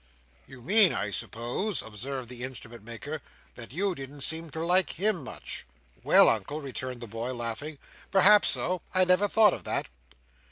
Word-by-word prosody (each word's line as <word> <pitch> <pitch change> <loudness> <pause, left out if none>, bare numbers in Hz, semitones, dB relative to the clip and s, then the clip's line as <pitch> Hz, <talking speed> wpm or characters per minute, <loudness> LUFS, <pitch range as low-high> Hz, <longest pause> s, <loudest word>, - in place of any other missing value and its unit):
"You 130 -2 -13
mean, 200 - +5
I 105 +1 -2
suppose," 120 - -4
observed 125 +4 -6
the 125 0 -9
Instrument 120 -4 -8
maker, 140 +7 -7 0.3
"that 115 -1 -10
you 190 +6 -1
didn't 140 -1 -9
seem 160 +3 0
to 160 - -5
like 180 +2 +3
him 195 -5 +1
much?" - - -6 0.4
"Well, - - +7
Uncle," 150 - 0
returned 130 -3 -6
the 120 - -6
boy, 115 +4 -4
laughing. 120 +6 -4 0.3
"Perhaps 200 +2 +6
so; 180 +1 0
I 185 0 +6
never 180 +3 +4
thought 210 -1 +5
of - - -6
that." - - -1
140 Hz, 165 wpm, -28 LUFS, 120-185 Hz, 0.4 s, Well